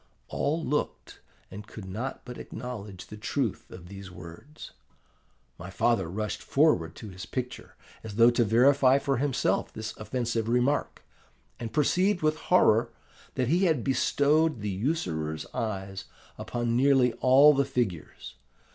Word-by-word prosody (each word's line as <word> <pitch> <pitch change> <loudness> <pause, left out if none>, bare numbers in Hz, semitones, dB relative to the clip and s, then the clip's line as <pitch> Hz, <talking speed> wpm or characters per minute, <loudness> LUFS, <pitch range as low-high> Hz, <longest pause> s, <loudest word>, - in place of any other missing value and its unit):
All 160 +3 -1
looked, 145 +4 -3 0.3
and 105 +2 -9
could 105 -3 -10
not 110 +8 -5
but 125 0 -8
acknowledge 105 -7 -8
the 105 - -10
truth 115 +1 -3
of 90 -2 -11
these 100 0 -10
words. 90 - -11 0.9
My 90 +1 -8
father 105 -2 +1
rushed 105 +3 -4
forward 135 - +2
to 110 - -9
his 95 +3 -9
picture, 125 0 -6 0.3
as 110 -2 -8
though 115 +2 +6
to 120 0 +2
verify 130 +4 +4
for 140 -1 -1
himself 135 0 0
this 110 0 -6
offensive 115 0 -2
remark, 125 +4 0 0.6
and 115 -2 -5
perceived 180 - +1
with 155 0 +2
horror 115 -10 +4 0.5
that 130 -2 0
he 180 +5 +3
had 155 -9 +1
bestowed 145 +1 +2
the 105 -1 -2
usurer's 90 - -2
eyes 95 -3 -4 0.3
upon 120 -1 -2
nearly 130 -1 +4
all 140 +4 +7
the 140 0 +2
figures. 105 - -4
120 Hz, 140 wpm, -27 LUFS, 105-140 Hz, 0.9 s, all